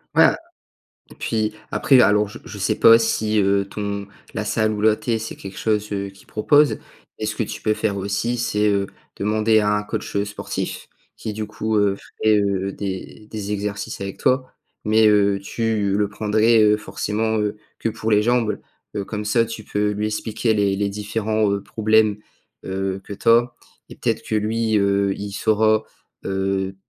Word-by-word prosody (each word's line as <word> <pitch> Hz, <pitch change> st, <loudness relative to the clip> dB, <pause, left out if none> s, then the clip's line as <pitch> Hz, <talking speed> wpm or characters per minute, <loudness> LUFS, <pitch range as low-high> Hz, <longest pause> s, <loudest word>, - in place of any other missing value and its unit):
Ouais, -, -, +7 dB
a -, -, +4 dB, 0.7 s
et -, -, -13 dB
puis 110 Hz, -2 st, -1 dB, 0.2 s
après, 135 Hz, -3 st, +5 dB
alors, 105 Hz, -2 st, +4 dB
je 100 Hz, -, -10 dB
je -, -, -9 dB
sais -, -, 0 dB
pas 115 Hz, 0 st, +8 dB
si, 110 Hz, -1 st, +1 dB
heu, 100 Hz, 0 st, +2 dB
ton 100 Hz, -1 st, -4 dB, 0.3 s
la 105 Hz, -, -2 dB
salle 110 Hz, +1 st, +1 dB
où 105 Hz, -1 st, -3 dB
là 110 Hz, 0 st, +5 dB
tu 120 Hz, -, -4 dB
es, 115 Hz, -, +1 dB
c'est 115 Hz, -, -6 dB
quelque 95 Hz, -1 st, -9 dB
chose, 105 Hz, -1 st, 0 dB
heu, 100 Hz, 0 st, -3 dB
qu'ils 95 Hz, 0 st, -19 dB
proposent 145 Hz, +7 st, +3 dB, 0.4 s
et 110 Hz, -, -2 dB
ce 110 Hz, 0 st, -2 dB
que 115 Hz, -, 0 dB
tu 105 Hz, 0 st, -7 dB
peux 110 Hz, -, +2 dB
faire 110 Hz, -1 st, -1 dB
aussi, 100 Hz, +5 st, -1 dB
c'est, 105 Hz, -3 st, +1 dB
heu, 100 Hz, -1 st, +1 dB, 0.3 s
demander 110 Hz, +2 st, +2 dB
à 105 Hz, 0 st, +2 dB
un 105 Hz, -, -3 dB
coach, 105 Hz, -, -5 dB
heu, 100 Hz, 0 st, +1 dB
sportif 105 Hz, 0 st, -5 dB, 0.3 s
qui, 110 Hz, -, -5 dB
du 110 Hz, +1 st, -4 dB
coup, 110 Hz, +1 st, -1 dB
heu, 100 Hz, -1 st, +3 dB, 0.3 s
crée, 110 Hz, -1 st, +4 dB
heu, 100 Hz, -1 st, 0 dB
des 100 Hz, +2 st, -6 dB
des 105 Hz, -2 st, -5 dB
exercices 100 Hz, 0 st, -4 dB
avec 100 Hz, 0 st, -5 dB
toi 130 Hz, 0 st, +1 dB, 0.3 s
mais 110 Hz, +1 st, +4 dB
heu, 100 Hz, -1 st, +3 dB
tu 105 Hz, -1 st, -1 dB
le 105 Hz, -1 st, +2 dB
prendrais, 110 Hz, +2 st, +3 dB
heu, 105 Hz, 0 st, +5 dB
forcément, 110 Hz, +1 st, -2 dB
heu, 105 Hz, 0 st, -1 dB, 0.2 s
que 115 Hz, -, 0 dB
pour 110 Hz, 0 st, -4 dB
les 105 Hz, 0 st, +4 dB
jambes. 115 Hz, -3 st, +1 dB, 0.4 s
Heu, 100 Hz, -, -1 dB
comme 105 Hz, -1 st, -5 dB
ça, 115 Hz, +2 st, +3 dB
tu 115 Hz, -1 st, -7 dB
peux 105 Hz, 0 st, 0 dB
lui 105 Hz, +1 st, -1 dB
expliquer 110 Hz, +1 st, -1 dB
les 100 Hz, -2 st, +2 dB
les 100 Hz, 0 st, 0 dB
différents, 105 Hz, +1 st, -1 dB
heu, 100 Hz, 0 st, -1 dB
problèmes, 110 Hz, -1 st, +2 dB, 0.5 s
heu, 95 Hz, 0 st, -2 dB
que 100 Hz, -, -7 dB
tu 100 Hz, -, 0 dB
as 120 Hz, +1 st, +4 dB, 0.4 s
et -, -, -10 dB
peut-être -, -, -1 dB
que 110 Hz, -, -1 dB
lui, 110 Hz, +1 st, 0 dB
heu, 100 Hz, -1 st, +2 dB
il 100 Hz, 0 st, -6 dB
saura, 110 Hz, +1 st, +2 dB, 0.4 s
heu, 95 Hz, 0 st, -1 dB
105 Hz, 195 wpm, -22 LUFS, 100-110 Hz, 0.7 s, pas